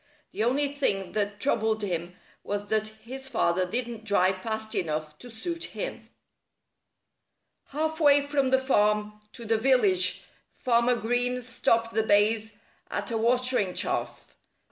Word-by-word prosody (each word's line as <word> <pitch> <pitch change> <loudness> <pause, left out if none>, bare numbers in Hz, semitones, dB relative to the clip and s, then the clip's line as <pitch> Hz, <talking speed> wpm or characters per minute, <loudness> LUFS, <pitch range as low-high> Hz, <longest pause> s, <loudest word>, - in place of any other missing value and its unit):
The - - -2
only 270 +5 +2
thing 235 -10 -1
that 205 -1 -2
troubled 220 -3 +1
him 175 -2 -3 0.3
was 205 0 -4
that 215 0 +1 0.2
his 265 +3 -7
father 185 -7 0
didn't 235 0 -4
drive 190 -3 +2
fast 220 +1 -3
enough 155 -2 -2
to 245 - -11
suit 335 +10 -5
him. - - -5 1.6
Half 315 +2 -2
way 285 -2 +5
from 285 -2 +1
the 265 - +4
farm 210 -5 +1
to 235 - -9
the 225 0 +1
village 205 -8 +3 0.3
Farmer 240 0 +2
Green 245 +2 -1
stopped 230 -1 0
the 220 - +2
bays 215 0 +2 0.3
at - - -4
a 225 - 0
watering 245 -4 +2
trough. - - -3
225 Hz, 140 wpm, -27 LUFS, 205-255 Hz, 1.6 s, way